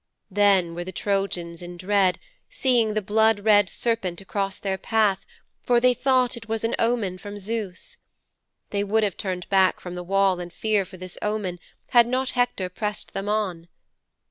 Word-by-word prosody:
Then 195 -4 +3
were 175 +1 -4
the 185 - -7
Trojans 185 -3 -2
in 175 0 -8
dread, 190 0 +2 0.3
seeing 235 -5 +2
the 215 - 0
blood 220 +1 +3
red 205 -2 +5
serpent 225 -7 -1
across 195 0 -3
their 190 -1 -3
path, 205 -2 +1 0.3
for 245 -1 +3
they 250 +1 +4
thought 255 -1 +2
it 225 -1 -10
was 225 0 -1
an 225 - 0
omen 225 -6 0
from 205 +1 -8
Zeus. 205 -2 -4 0.7
They 200 0 0
would 215 +2 +1
have 200 -4 0
turned 185 -2 -4
back 190 -1 +3
from 180 - -7
the 180 - -5
wall 195 0 +2
in 175 -1 -6
fear 210 +2 0
for 185 - -12
this 185 0 -8
omen 210 -4 -2 0.3
had 240 -1 +6
not 255 +1 0
Hector 245 -7 0
pressed 210 +3 -4
them 195 +1 -3
on. 190 -6 -1
200 Hz, 175 wpm, -24 LUFS, 185-220 Hz, 0.7 s, had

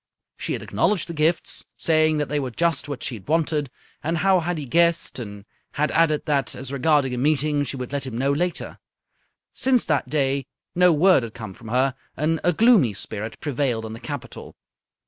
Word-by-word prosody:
She - - -3
had - - -4
acknowledged 205 -6 0
the 170 - -6
gifts, 160 +2 +1
saying 155 -1 +3
that 150 -1 -1
they 150 +1 -1
were 130 -2 -3
just 165 +4 0
what 140 -4 -5
she - - -2
had 105 -5 -10
wanted 155 -2 0 0.3
and 165 +2 -1
how 190 +2 +3
had 175 0 -2
he 150 - -5
guessed, 170 +1 +2
and 100 -3 -8 0.3
had 150 +1 0
added 155 -2 +2
that, 140 -4 0
as 135 +1 -6
regarded 140 -1 +2
a 125 - -2
meeting, 150 +1 +1
she 140 - -4
would 125 0 -6
let 140 -2 -2
him 115 -3 -5
know 135 +3 +1
later. 175 +5 -2 0.7
Since 255 -2 +3
that 150 -4 0
day 135 -2 0 0.3
no 180 0 +5
word 170 0 +5
had 115 -2 -7
come 110 -5 -7
from 115 - -13
her, 130 +4 +1 0.2
and 155 +2 0
a 175 - +4
gloomy 215 - +4
spirit 105 +3 -6
prevailed 130 -6 -1
in 110 - -6
the 115 - -8
capital. - - -8
145 Hz, 200 wpm, -23 LUFS, 130-165 Hz, 0.7 s, no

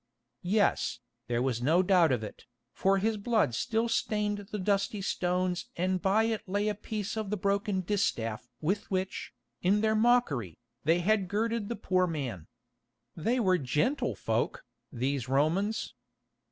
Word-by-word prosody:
Yes, 200 - +1 0.3
there 120 0 0
was 125 -3 -1
no 165 +8 +4
doubt 180 -5 +4
of 120 -4 0
it, 105 - -9 0.3
for 195 +1 +2
his 215 +3 0
blood 215 - +1
still 225 - 0
stained 210 -3 -1
the 210 - -2
dusty 200 +1 0
stones 180 -1 -1
and 185 +1 0
by 200 +3 +3
it 225 -1 0
lay 205 +2 +1
a - - 0
piece 210 0 -4
of 215 -3 -3
the 210 - -1
broken 200 0 0
distaff 125 - -1
with 195 +7 -1
which, 190 0 -2 0.3
in 200 +3 +3
their 220 0 +2
mockery, 215 - +2 0.3
they 165 +3 +3
had 200 +1 +2
girded 220 +2 -1
the 235 - -2
poor 185 -3 +1
man. 130 - -4 0.7
They 230 +10 0
were 185 -5 +3
gentle 235 - 0
folk, 115 +1 -1 0.3
these 130 0 -2
Romans! 170 +11 +1
195 Hz, 155 wpm, -30 LUFS, 155-210 Hz, 0.7 s, no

